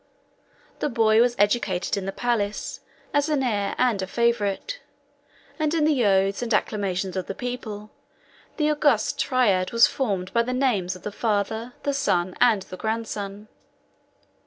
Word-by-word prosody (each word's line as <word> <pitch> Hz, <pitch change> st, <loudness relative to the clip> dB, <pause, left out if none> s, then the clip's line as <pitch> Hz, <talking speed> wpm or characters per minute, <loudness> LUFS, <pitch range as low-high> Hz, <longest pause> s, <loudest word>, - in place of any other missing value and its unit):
The -, -, 0 dB
boy 225 Hz, -2 st, +4 dB
was 240 Hz, 0 st, +2 dB
educated 205 Hz, -3 st, +1 dB
in 195 Hz, -1 st, -4 dB
the -, -, -1 dB
palace 210 Hz, -3 st, -2 dB, 0.3 s
as 290 Hz, +1 st, +2 dB
an 290 Hz, -3 st, +1 dB
heir 205 Hz, -5 st, -1 dB
and 240 Hz, -6 st, +2 dB
a 190 Hz, -, -3 dB
favorite; 235 Hz, -, 0 dB, 0.8 s
and 310 Hz, +1 st, +1 dB
in 310 Hz, -2 st, +2 dB
the 290 Hz, -5 st, +2 dB
oaths 195 Hz, +1 st, +2 dB
and 240 Hz, -1 st, -3 dB
acclamations 195 Hz, -3 st, -1 dB
of 185 Hz, -2 st, -3 dB
the 195 Hz, -, -5 dB
people, 220 Hz, -4 st, -6 dB, 0.7 s
the 305 Hz, -1 st, +2 dB
august 290 Hz, -7 st, +2 dB
triad 210 Hz, -9 st, +2 dB
was 230 Hz, -2 st, +6 dB
formed 190 Hz, -4 st, -2 dB
by 235 Hz, -, +4 dB
the 250 Hz, +2 st, -2 dB
names 215 Hz, -9 st, 0 dB
of 180 Hz, -, -13 dB
the 210 Hz, -, -4 dB
father, 220 Hz, +3 st, -1 dB
the 285 Hz, -, 0 dB
son, 185 Hz, -10 st, 0 dB
and 225 Hz, -6 st, +4 dB
the 185 Hz, -, -10 dB
grandson. 215 Hz, -1 st, -4 dB
220 Hz, 160 wpm, -24 LUFS, 195-250 Hz, 0.8 s, was